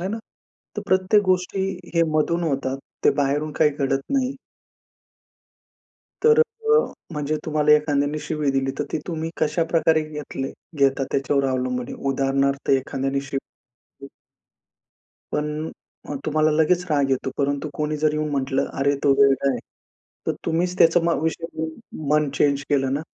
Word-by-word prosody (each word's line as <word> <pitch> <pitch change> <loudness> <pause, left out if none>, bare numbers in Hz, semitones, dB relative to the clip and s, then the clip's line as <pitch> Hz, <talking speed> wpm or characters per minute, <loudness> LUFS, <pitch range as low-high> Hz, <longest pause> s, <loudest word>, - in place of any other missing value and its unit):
आहे 185 - -2
ना. 220 - -3 0.6
तर - - -3
प्रत्येक 190 +3 +3
गोष्टी 185 +1 +1 0.3
हे 170 - +4
मधून 170 +3 +1
होतात. 135 -3 -1 0.3
ते - - +7
बाहेरून 145 +2 0
काही 155 -2 +6
घडत 135 0 +1
नाही. 265 -1 +1 1.9
तर 455 0 +6
अ, 455 -1 +2 0.3
म्हणजे 150 0 -1
तुम्हाला 150 -1 +3
एखाद्याने 150 0 +2
शिवी 150 -3 0
दिली, 135 0 0
तर - - 0
ती - - 0
तुम्ही 165 -2 -3
कशा 160 +2 +1
प्रकारे 160 -1 +4
घेतले 150 -3 -5 0.3
घेता 135 0 +3
त्याच्यावर 140 0 +1
अवलंबून 125 -1 -1
आहे. - - -5 0.2
उदाहरणार्थ 135 0 0
एखाद्याने 135 0 0
शिवी 135 0 -4 0.6
दिली 140 - -9 1.2
पण 150 +1 -2 0.4
अ, - - -3
तुम्हाला 155 0 +2
लगेच 160 +3 +2
राग 140 -2 +2
येतो. 135 0 0
परंतु 140 +1 0
कोणी 150 +1 -1
जर 150 0 +1
येऊन 155 0 -1
म्हटलं 135 -1 0
"अरे 140 +1 +2
तो 140 - +5
वेडा 140 0 +4
आहे" 125 - -2 0.7
तर - - +2
तुम्हीच 175 +2 0
त्याचा 165 +1 +6
मग 170 -2 +1
विषय 160 +1 -1
घेऊन, 160 0 -1 0.4
मन 150 0 +3
चेंज 140 0 +2
केलं 135 -2 +1
ना, 145 - -1
150 Hz, 155 wpm, -23 LUFS, 140-160 Hz, 1.9 s, ते